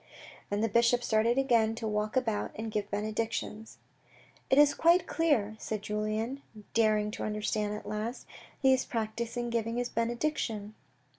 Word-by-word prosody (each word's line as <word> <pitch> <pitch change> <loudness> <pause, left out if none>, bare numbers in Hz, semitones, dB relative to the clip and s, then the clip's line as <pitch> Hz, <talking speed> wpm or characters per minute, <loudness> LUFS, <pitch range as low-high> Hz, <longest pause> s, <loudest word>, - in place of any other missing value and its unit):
And 205 +1 0
the - - +3
bishop 235 +2 +3
started 230 +2 +2
again 230 -5 +3
to 225 -1 -4
walk 210 +1 -1
about 225 -5 0
and 220 0 -4
give 210 -1 -2
benedictions. 215 +1 -3 0.4
" - - -28
It 265 - +4
is 290 0 +7
quite 340 +2 +4
clear," 265 -13 +1
said 215 -2 -4
Julien, 215 +5 -2 0.3
daring 215 -2 +3
to - - -5
understand 210 0 -1
at 210 -1 -8
last, 215 +4 -4 0.2
" - - -23
He 265 0 +6
is 260 - +2
practising 235 +1 -3
giving 230 0 -1
his 245 0 -1
benediction." 230 -3 -2
225 Hz, 160 wpm, -30 LUFS, 215-240 Hz, 0.4 s, is